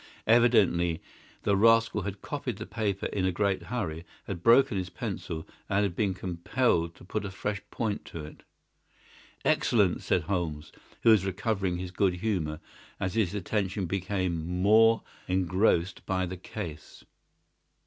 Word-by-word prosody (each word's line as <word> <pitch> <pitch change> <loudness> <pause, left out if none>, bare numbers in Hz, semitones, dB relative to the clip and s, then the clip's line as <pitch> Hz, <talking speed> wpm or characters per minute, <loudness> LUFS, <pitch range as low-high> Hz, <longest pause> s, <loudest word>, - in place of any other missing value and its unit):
Evidently 100 -8 +4 0.4
the 100 - +3
rascal 115 +1 +4
had 100 +1 -6
copied 135 -7 -4
the 110 - -6
paper 105 -5 -2
in 95 - -1
a 95 - +2
great 100 +1 0
hurry, 85 -10 -4 0.2
had 85 - -5
broken 115 +2 +5
his 95 -1 -2
pencil, 80 -2 -5 0.2
and 100 +1 +2
had 95 -4 -1
been 100 -3 0
compelled 85 0 0
to - - -16
put 105 +3 -3
a 100 - -4
fresh 100 +1 -3
point 110 -3 -2
to 80 -3 -7
it." 75 - -12 1.0
"Excellent!" 100 -7 +3
said 90 - +1
Holmes, 80 -4 -3 0.3
who 115 - +7
was 105 -4 +5
recovering 95 -1 -1
his 90 0 -5
good 90 0 +1
humour 90 -6 -2 0.4
as 95 -2 -2
his 105 -4 +1
attention 100 -1 -1
became 95 -2 -1 0.2
more 115 +2 +5 0.2
engrossed 90 0 +1
by 95 -1 0
the 90 +1 -5
case. 85 -4 -8
95 Hz, 150 wpm, -28 LUFS, 90-105 Hz, 1.0 s, who